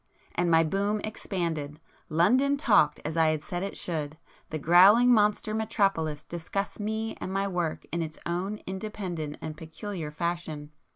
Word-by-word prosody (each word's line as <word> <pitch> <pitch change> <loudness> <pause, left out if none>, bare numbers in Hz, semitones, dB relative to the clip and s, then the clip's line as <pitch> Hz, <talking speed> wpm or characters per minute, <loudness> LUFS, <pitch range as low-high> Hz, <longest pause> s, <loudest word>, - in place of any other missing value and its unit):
And 175 0 +1
my 165 0 +5
'boom' 200 +6 0
expanded,—London 175 - -1
'talked' 205 - +4
as 155 +1 -3
I 165 -1 +4
had 155 -1 0
said 175 -1 -4
it 195 - -4
should; 155 -3 -3 0.3
the 155 - -3
growling 195 - +7
monster 210 0 +2
metropolis 195 -9 0
discussed 175 +5 -4
me 220 +1 -2
and 185 - -4
my 195 +1 0
work 175 -4 -2
in 170 - -1
its 155 -1 -5
own 185 +5 -2
independent 190 -6 -4
and 155 -1 -5
peculiar 160 +1 -6
fashion. 155 -2 -4
175 Hz, 150 wpm, -28 LUFS, 160-205 Hz, 0.3 s, growling